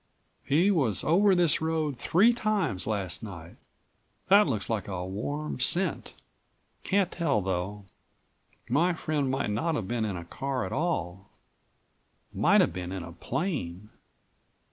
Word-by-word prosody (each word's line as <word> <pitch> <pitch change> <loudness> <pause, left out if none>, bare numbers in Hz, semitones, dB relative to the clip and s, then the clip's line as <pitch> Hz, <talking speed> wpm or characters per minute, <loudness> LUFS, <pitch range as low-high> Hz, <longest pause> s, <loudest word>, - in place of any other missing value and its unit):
"He 170 +8 +3
was 130 - +1
over 190 +5 +4
this 175 -4 +3
road 160 -3 -1
three 190 - +4
times 215 - -1
last 100 -5 -2
night. 85 -6 -9 0.7
That 200 0 +7
looks 110 -8 -2
like 110 -4 -2
a 90 -2 -4
warm 145 +11 -4
scent. 175 +9 0 0.7
Can't 195 -2 +1
tell, 160 -9 +1
though. 95 +2 -3 0.8
My 170 +8 +2
friend 150 -4 -1
might 130 -5 -1
not 160 +10 0
have 105 -9 -3
been 120 0 -1
in 100 -4 -3
a 85 - -7
car 135 +7 -3
at - - -5
all; 95 - -2 1.0
might - - +4
have - - +1
been 90 0 -5
in 95 -2 -4
a 85 - -9
plane. 105 - -4
130 Hz, 145 wpm, -28 LUFS, -, 1.0 s, That